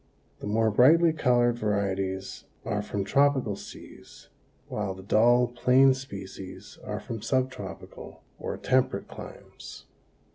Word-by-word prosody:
The - - -6
more 110 +1 +2
brightly 160 +9 +5
colored 120 -5 +2
varieties 95 -2 -2 0.2
are 105 -1 -1
from 100 -1 -3
tropical 130 0 +2
seas, - - -13 0.4
while 105 -3 -3
the 95 - -11
dull, 120 +5 +4
plain 130 +2 +4
species 100 -7 -9
are - - -4
from 115 -2 -7
subtropical 130 -8 -4 0.2
or - - -4
temperate 130 0 0
climes. - - -11
115 Hz, 115 wpm, -27 LUFS, 100-130 Hz, 0.4 s, brightly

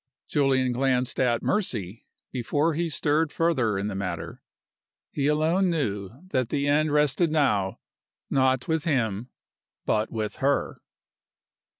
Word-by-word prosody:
Julian 135 -3 +2
glanced 130 0 0
at 120 -2 +2
Mercy 115 - -2 0.2
before 145 +6 0
he 170 +2 -1
stirred 150 +1 +1
further 130 -11 +1
in 100 - -2
the 105 - -3
matter. 85 -4 -5 0.7
He 140 -1 0
alone 160 +5 +2
knew 105 - -1 0.2
that 130 -7 0
the 140 +1 0
end 150 +1 +2
rested 150 +3 +3
now 105 -11 +1 0.5
not 130 -2 +2
with 160 -1 0
him 120 - -1 0.6
but 110 +1 0
with 110 -1 -3
her. 140 +1 0
135 Hz, 125 wpm, -26 LUFS, 110-150 Hz, 0.7 s, rested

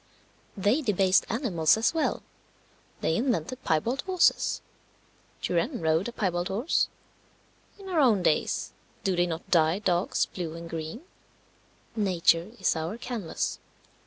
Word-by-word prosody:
They 205 +10 +2
debased 195 -6 +3
animals 205 - +2
as 225 +6 +2
well; 325 - 0 0.8
they 160 - +1
invented 255 +2 -1
piebald 230 - 0
horses. 370 -2 +2 0.8
Turenne 170 -2 0
rode 160 +4 +1
a - - -4
piebald 180 -6 -1
horse. 225 - +1 0.9
In 395 -1 -11
our 355 -4 0
own 225 -10 +4
days 155 - 0 0.3
do 190 -2 +1
they 175 0 +2
not 165 -1 -5
dye 160 0 +4
dogs 185 -3 +1
blue 165 -3 -6
and 170 0 -8
green? 165 - -6 0.9
Nature 180 -4 +2
is 190 - +2
our 165 +7 -3
canvas. 235 -8 -3
190 Hz, 130 wpm, -27 LUFS, 170-240 Hz, 0.9 s, own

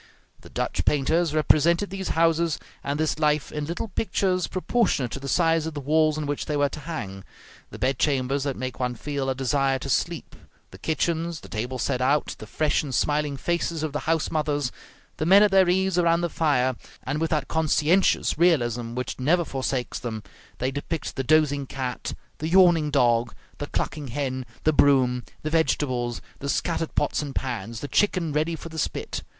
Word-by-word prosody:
The - - -14
Dutch - - -2
painters 155 +3 +1
represented 170 +5 +3
these 195 -1 -4
houses 165 -1 +3 0.3
and 140 +1 -2
this 155 0 0
life 150 -2 +1
in 150 -1 -3
little 170 +6 -4
pictures 185 -2 0
proportionate 185 - 0
to - - -5
the 140 - -7
size 165 -1 +2
of 160 - -6
the - - -3
walls 155 +2 +2
on 155 - -2
which 145 0 -3
they 150 - 0
were 145 0 +2
to 150 - -7
hang; 100 - -6 0.5
the - - -9
bedchambers 135 0 +1
that 140 -1 -2
make 130 0 -5
one 125 -1 -1
feel 140 +1 -3
a 130 - 0
desire 135 0 +1
to 135 +1 -4
sleep, 170 +2 -1 0.4
the - - -12
kitchens, 165 +1 -1
the - - -11
tables 120 +3 -3
set 125 - -1
out, 140 +4 +1
the - - -9
fresh 155 -1 +1
and 140 -5 -4
smiling 150 -1 0
faces 170 0 -1
of 155 -3 -3
the 150 - -1
house 165 -1 +1
mothers, 145 -4 0 0.5
the 155 - -1
men 195 +3 +8
at 210 - +3
their 190 -2 +5
ease 190 0 +2
around 170 0 +3
the 175 - 0
fire; 130 -5 +1 0.3
and 145 +4 -2
with 165 - +1
that 155 -2 0
conscientious 160 +2 +2
realism 120 -9 +2
which 125 0 -4
never 165 +6 +2
forsakes 130 -3 -2
them, 110 -3 -5 0.3
they 130 +1 -1
depict 145 +3 -4
the 135 - -2
dozing 145 -1 +2
cat, 130 -2 -4 0.2
the 155 - -2
yawning 175 -4 +5
dog, 120 -3 +2 0.2
the - - -4
clucking 150 -3 -3
hen, 130 0 -3 0.2
the 155 - +3
broom, 130 -4 +4 0.2
the 155 - -2
vegetables, 130 -7 0 0.2
the 140 - -4
scattered 165 +1 -1
pots - - +1
and 145 -2 -6
pans, 115 -3 -4
the 145 - -4
chicken 170 0 +1
ready 155 +3 0
for 165 - -9
the 160 -1 -6
spit. - - -3
150 Hz, 190 wpm, -25 LUFS, 130-165 Hz, 0.5 s, men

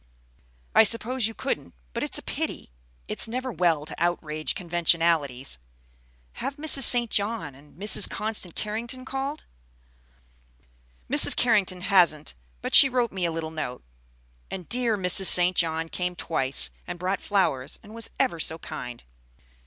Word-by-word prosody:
"I - - +5
suppose 230 +2 -1
you 225 - -9
couldn't; - - -6 0.2
but - - -6
it's - - 0
a - - -6
pity. - - -6 0.4
It's - - +1
never 255 +3 -6
well 170 -7 -2
to - - -10
outrage 155 -3 -4
conventionalities. 165 - -2 0.8
Have 275 - -6
Mrs. 290 -3 +7
St. 240 -2 +7
John 200 -8 -4
and 145 +4 -21
Mrs. 210 +2 +6
Constant 210 -4 0
Carrington 235 +4 -6
called?" 270 +3 -7 1.6
"Mrs. - - +8
Carrington 200 -6 -1
hasn't, 175 -6 0 0.3
but - - -6
she 275 - +7
wrote 245 -3 -2
me 185 -2 -4
a 170 - -3
little 160 -1 -7
note. 140 -6 -8 0.7
And 185 -3 -9
dear 235 -3 -1
Mrs. 185 0 +4
St. 180 +1 +5
John 165 -1 -3
came 180 +1 -6
twice, 135 -6 -1 0.2
and - - -8
brought 185 +2 -4
flowers, 160 -10 -3
and 215 - -16
was 230 0 -3
ever 255 -11 -2
so 160 0 -3
kind. 125 -6 -10
180 Hz, 145 wpm, -23 LUFS, 160-225 Hz, 1.6 s, Mrs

